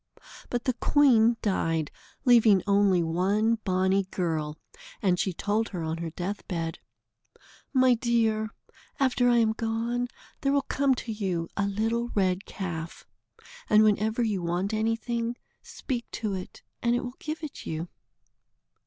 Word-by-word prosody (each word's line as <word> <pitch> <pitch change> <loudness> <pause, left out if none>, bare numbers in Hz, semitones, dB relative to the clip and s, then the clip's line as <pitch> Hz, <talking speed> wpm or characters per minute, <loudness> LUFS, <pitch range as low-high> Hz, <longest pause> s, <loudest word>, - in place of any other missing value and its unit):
But 245 -1 -2
the 255 - +2
queen 240 -3 +4
died, 165 -6 0 0.3
leaving 225 -6 +6
only 200 -3 +3
one 200 +7 +1
bonny 190 0 +2
girl, 160 -5 -2 0.4
and 185 -4 +1
she 190 - +1
told 210 +5 -1
her 175 -4 -4
on 160 +1 -3
her 170 -1 -3
death 185 +5 -5
bed: 165 -3 -3 0.9
"My 255 -2 +5
dear, 225 -2 +1 0.5
after 250 -2 +3
I 240 - +4
am 225 -1 +3
gone, 230 +2 -1 0.3
there 275 0 +2
will 280 -1 +2
come 275 -1 +1
to 245 - -5
you 185 -6 -2
a 200 -1 0
little 225 +4 -1
red 190 -1 +1
calf, 170 -4 -6 0.6
and 215 0 +6
whenever 215 +2 +2
you 210 -5 0
want 175 +5 -1
anything, 230 +2 -1 0.3
speak 245 -4 -5
to 215 -3 -2
it, 185 -1 -7 0.2
and 235 0 +2
it 245 - -1
will 245 0 -5
give 315 +1 -5
it 300 - -7
you." 160 +2 -3
215 Hz, 145 wpm, -27 LUFS, 185-235 Hz, 0.9 s, leaving